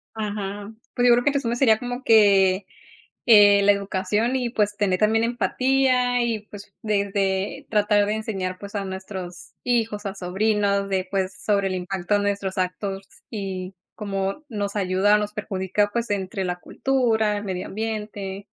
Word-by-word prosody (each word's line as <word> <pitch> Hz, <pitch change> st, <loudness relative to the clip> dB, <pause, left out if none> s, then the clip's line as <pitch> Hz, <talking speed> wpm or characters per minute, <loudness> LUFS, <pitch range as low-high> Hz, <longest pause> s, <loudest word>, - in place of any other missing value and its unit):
Ajá, 205 Hz, -1 st, -4 dB, 0.2 s
pues 245 Hz, -1 st, +2 dB
yo 240 Hz, -, +7 dB
creo 245 Hz, +1 st, +2 dB
que 290 Hz, -, +3 dB
tu 280 Hz, -, 0 dB
zona 240 Hz, -3 st, -2 dB
sería 240 Hz, -3 st, +4 dB
como 245 Hz, +1 st, -5 dB
que, 200 Hz, -4 st, +5 dB, 0.6 s
eh, 205 Hz, -3 st, +7 dB
la 205 Hz, -, +6 dB
educación 200 Hz, +4 st, -1 dB
y, 245 Hz, -2 st, -1 dB
pues, 210 Hz, -3 st, 0 dB
tener 195 Hz, -3 st, +1 dB
también 220 Hz, +1 st, +3 dB
empatía 250 Hz, 0 st, +1 dB
y, 225 Hz, -3 st, -2 dB
pues, 205 Hz, -1 st, -11 dB
desde 200 Hz, +3 st, -1 dB
tratar 210 Hz, -1 st, +3 dB
de 210 Hz, -, 0 dB
enseñar, 195 Hz, -4 st, -3 dB
pues, 200 Hz, +1 st, -10 dB
a 200 Hz, -, -2 dB
nuestros 190 Hz, -2 st, -7 dB
hijos, 225 Hz, -4 st, 0 dB
a 195 Hz, -, -3 dB
sobrinos 200 Hz, +1 st, 0 dB
de, 190 Hz, -1 st, -1 dB
pues, 190 Hz, -1 st, -1 dB
sobre 200 Hz, -2 st, +2 dB
el 185 Hz, -, -3 dB
impacto 185 Hz, +1 st, -2 dB
de 205 Hz, -, +3 dB
nuestros 200 Hz, -2 st, -2 dB
actos 190 Hz, +2 st, -2 dB, 0.3 s
y 190 Hz, -3 st, -5 dB, 0.2 s
cómo 195 Hz, +5 st, -3 dB
nos 205 Hz, -4 st, -3 dB
ayuda 195 Hz, +1 st, +2 dB
o -, -, +2 dB
nos 210 Hz, 0 st, -3 dB
perjudica, 205 Hz, -1 st, -1 dB
pues, 235 Hz, +1 st, -2 dB
entre 190 Hz, -1 st, -2 dB
la 180 Hz, -1 st, -2 dB
cultura, 225 Hz, -6 st, 0 dB
el 205 Hz, -, -7 dB
medio 185 Hz, -2 st, -4 dB
ambiente. 210 Hz, -2 st, -5 dB
205 Hz, 170 wpm, -23 LUFS, 195-220 Hz, 0.6 s, yo